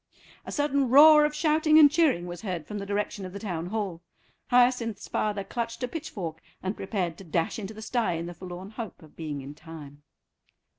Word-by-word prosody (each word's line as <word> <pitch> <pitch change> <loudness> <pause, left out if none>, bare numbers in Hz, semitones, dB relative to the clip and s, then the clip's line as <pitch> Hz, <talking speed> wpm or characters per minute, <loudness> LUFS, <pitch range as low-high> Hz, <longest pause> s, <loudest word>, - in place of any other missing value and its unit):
A - - -5
sudden 280 -3 +1
roar 300 +3 +8
of 300 0 -2
shouting 310 0 +3
and 295 -2 +8
cheering 295 - +2
was 175 -1 -7
heard 180 -7 -4
from 210 +4 -5
the 200 - -6
direction 205 0 -2
of 185 -1 -7
the - - -5
Town 175 -5 -4
Hall. 195 -4 -3 0.5
Hyacinth's 245 -3 +2
father 210 -2 -1
clutched 230 +3 -4
a - - 0
pitchfork 190 - -6 0.2
and 190 +3 -2
prepared 185 -4 -3
to - - -9
dash 165 +3 -1
into 210 +1 -6
the 220 - -8
stye 235 -5 0
in 165 0 -3
the 175 - -6
forlorn 185 +2 -9
hope 220 -6 -7
of 155 - -17
being 150 -4 -5
in 140 +2 -8
time. 150 -3 -11
200 Hz, 200 wpm, -27 LUFS, 175-250 Hz, 0.5 s, roar